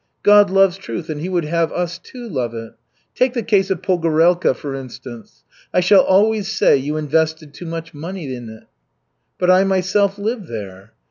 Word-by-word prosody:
God 205 Hz, -1 st, +6 dB
loves 195 Hz, -1 st, +3 dB
truth 175 Hz, -4 st, -6 dB
and 150 Hz, -1 st, -5 dB
He 180 Hz, -, -4 dB
would 175 Hz, -3 st, -1 dB
have 165 Hz, +1 st, 0 dB
us, 175 Hz, -1 st, -3 dB
too, 240 Hz, +6 st, -11 dB
love 125 Hz, -, -3 dB
it. 115 Hz, 0 st, -8 dB, 0.4 s
Take 255 Hz, 0 st, +1 dB
the 235 Hz, -, -1 dB
case 200 Hz, -3 st, +2 dB
of 190 Hz, -3 st, -2 dB
Pogorelka, 170 Hz, -3 st, +2 dB
for 140 Hz, +2 st, -6 dB
instance. 130 Hz, -3 st, -10 dB, 0.3 s
I -, -, +2 dB
shall 190 Hz, +2 st, +6 dB
always 210 Hz, +1 st, +2 dB
say 215 Hz, -, +4 dB
you 145 Hz, +3 st, -2 dB
invested 155 Hz, 0 st, -1 dB
too 175 Hz, +3 st, -9 dB
much 165 Hz, 0 st, -6 dB
money 160 Hz, -2 st, -6 dB
in 120 Hz, -2 st, -8 dB
it." 110 Hz, 0 st, -12 dB, 0.7 s
"But 180 Hz, 0 st, +3 dB
I 185 Hz, +1 st, +5 dB
myself 195 Hz, +1 st, +1 dB
lived 210 Hz, -1 st, -3 dB
there." 100 Hz, -2 st, -9 dB
170 Hz, 185 wpm, -19 LUFS, 145-195 Hz, 0.7 s, God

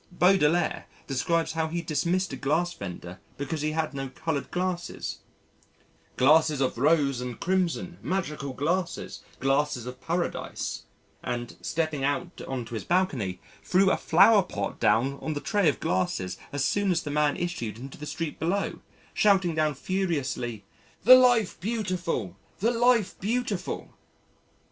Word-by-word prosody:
Baudelaire 175 Hz, -2 st, +3 dB, 0.2 s
describes 160 Hz, +5 st, 0 dB
how 160 Hz, 0 st, -1 dB
he 170 Hz, +1 st, -3 dB
dismissed 170 Hz, +3 st, 0 dB
a -, -, -2 dB
glass 155 Hz, +7 st, 0 dB
vendor 90 Hz, -, -8 dB, 0.2 s
because 145 Hz, +2 st, -3 dB
he 155 Hz, +1 st, -1 dB
had 155 Hz, -1 st, -1 dB
no 135 Hz, -1 st, -4 dB
coloured 150 Hz, +2 st, -3 dB
glasses 180 Hz, -1 st, -3 dB, 1.0 s
"glasses 155 Hz, +2 st, +5 dB
of 130 Hz, -3 st, 0 dB
rose 140 Hz, -3 st, +3 dB
and 125 Hz, -2 st, -5 dB
crimson, 180 Hz, -1 st, -1 dB
magical 150 Hz, -7 st, -2 dB
glasses, 170 Hz, +7 st, -2 dB, 0.2 s
glasses 135 Hz, -2 st, +1 dB
of 125 Hz, 0 st, -8 dB
Paradise" 175 Hz, +1 st, -3 dB, 0.4 s
and, 120 Hz, -1 st, -4 dB
stepping 155 Hz, -4 st, -1 dB
out 145 Hz, +6 st, -2 dB
on 130 Hz, -3 st, -3 dB
to 120 Hz, -, -10 dB
his 110 Hz, -, -3 dB
balcony, 135 Hz, -, 0 dB, 0.2 s
threw 190 Hz, +1 st, +4 dB
a -, -, +3 dB
flowerpot 185 Hz, -, +3 dB
down 115 Hz, +6 st, +2 dB
on 155 Hz, -, -2 dB
the 145 Hz, -, -3 dB
tray 200 Hz, 0 st, +2 dB
of 130 Hz, -, -2 dB
glasses 90 Hz, 0 st, -1 dB, 0.2 s
as 140 Hz, -1 st, 0 dB
soon 205 Hz, -1 st, +1 dB
as 175 Hz, -2 st, +1 dB
the 145 Hz, -, -4 dB
man 150 Hz, 0 st, +2 dB
issued 140 Hz, -, -3 dB
into 135 Hz, +4 st, -9 dB
the 150 Hz, -, -6 dB
street 160 Hz, 0 st, -4 dB
below, 185 Hz, +6 st, -1 dB, 0.3 s
shouting 190 Hz, -5 st, +3 dB
down 155 Hz, -2 st, +1 dB
furiously, 140 Hz, -, -2 dB, 0.4 s
"The 250 Hz, +6 st, +10 dB
Life 245 Hz, -5 st, +5 dB
Beautiful! 185 Hz, -, -2 dB, 0.2 s
The 225 Hz, +4 st, +2 dB
Life 240 Hz, -3 st, +2 dB
Beautiful." 215 Hz, -3 st, -2 dB
160 Hz, 145 wpm, -27 LUFS, 135-185 Hz, 1.0 s, The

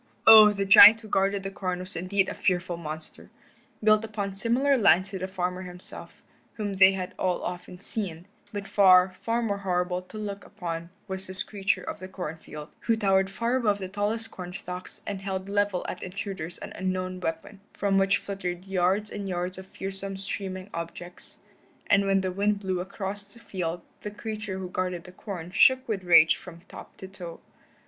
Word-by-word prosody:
Oh, 215 Hz, -1 st, +10 dB
the 200 Hz, -1 st, -2 dB
giant 210 Hz, +3 st, +10 dB
who 220 Hz, -, -11 dB
guarded 195 Hz, 0 st, +1 dB
the 195 Hz, -, -4 dB
corn 185 Hz, -2 st, -3 dB
was 185 Hz, +1 st, -8 dB
indeed 190 Hz, +3 st, 0 dB
a -, -, -3 dB
fearful 180 Hz, -1 st, 0 dB
monster. 155 Hz, -1 st, -8 dB, 0.5 s
Built 215 Hz, 0 st, +5 dB
upon 210 Hz, -3 st, -4 dB
similar 240 Hz, +7 st, +2 dB
lines 195 Hz, -5 st, +4 dB
to 190 Hz, -, -4 dB
the 185 Hz, -, -3 dB
farmer 180 Hz, -1 st, -3 dB
himself, 180 Hz, -1 st, -10 dB, 0.3 s
whom 205 Hz, -3 st, -3 dB
they 190 Hz, 0 st, +7 dB
had 185 Hz, -1 st, -4 dB
all 180 Hz, -1 st, 0 dB
often 180 Hz, 0 st, -6 dB
seen, 180 Hz, -4 st, -5 dB, 0.3 s
but 205 Hz, -1 st, -5 dB
far, 185 Hz, -2 st, +6 dB
far 230 Hz, +5 st, -2 dB
more 200 Hz, -3 st, -1 dB
horrible 180 Hz, -1 st, -1 dB
to 185 Hz, +4 st, -12 dB
look 200 Hz, -2 st, -5 dB
upon 170 Hz, -1 st, -6 dB, 0.2 s
was 190 Hz, -1 st, -2 dB
this 190 Hz, +1 st, -3 dB
creature 195 Hz, -3 st, -1 dB
of -, -, -6 dB
the 185 Hz, -, -7 dB
corn 180 Hz, -4 st, -6 dB
field, 150 Hz, -1 st, -10 dB
who 230 Hz, -, +1 dB
towered 195 Hz, -3 st, +2 dB
far 235 Hz, +5 st, 0 dB
above 210 Hz, -5 st, +1 dB
the 190 Hz, -2 st, -5 dB
tallest 210 Hz, +3 st, -2 dB
corn 180 Hz, -1 st, -8 dB
stalks 180 Hz, 0 st, -8 dB
and 200 Hz, -2 st, -4 dB
held 190 Hz, -1 st, -4 dB
leveled 205 Hz, -2 st, 0 dB
at -, -, -5 dB
intruders 185 Hz, -3 st, -5 dB
an -, -, -8 dB
unknown 185 Hz, 0 st, -3 dB
weapon, 165 Hz, +4 st, -5 dB
from 195 Hz, -1 st, +1 dB
which 195 Hz, 0 st, +3 dB
fluttered 185 Hz, -2 st, -5 dB
yards 195 Hz, +2 st, +1 dB
and 200 Hz, -2 st, -5 dB
yards 180 Hz, +1 st, -3 dB
of 190 Hz, -, -11 dB
fearsome 195 Hz, 0 st, -6 dB
streaming 190 Hz, -1 st, -5 dB
objects, 170 Hz, +1 st, -8 dB, 0.5 s
and 200 Hz, 0 st, +4 dB
when 195 Hz, 0 st, +3 dB
the 185 Hz, -1 st, -2 dB
wind 200 Hz, +2 st, +1 dB
blew 190 Hz, -2 st, -2 dB
across 200 Hz, +2 st, -6 dB
the 235 Hz, -, -16 dB
field 175 Hz, -6 st, -4 dB, 0.2 s
the 210 Hz, -, -4 dB
creature 210 Hz, -2 st, -5 dB
who 190 Hz, -1 st, -5 dB
guarded 180 Hz, -2 st, -2 dB
the 180 Hz, -, -12 dB
corn 180 Hz, -3 st, -7 dB
shook 260 Hz, +6 st, +5 dB
with 205 Hz, -5 st, -2 dB
rage 165 Hz, -2 st, +7 dB
from 170 Hz, -2 st, -12 dB
top 180 Hz, -, -13 dB
to 190 Hz, -, -8 dB
toe. 180 Hz, -3 st, -9 dB
190 Hz, 190 wpm, -27 LUFS, 180-205 Hz, 0.5 s, Oh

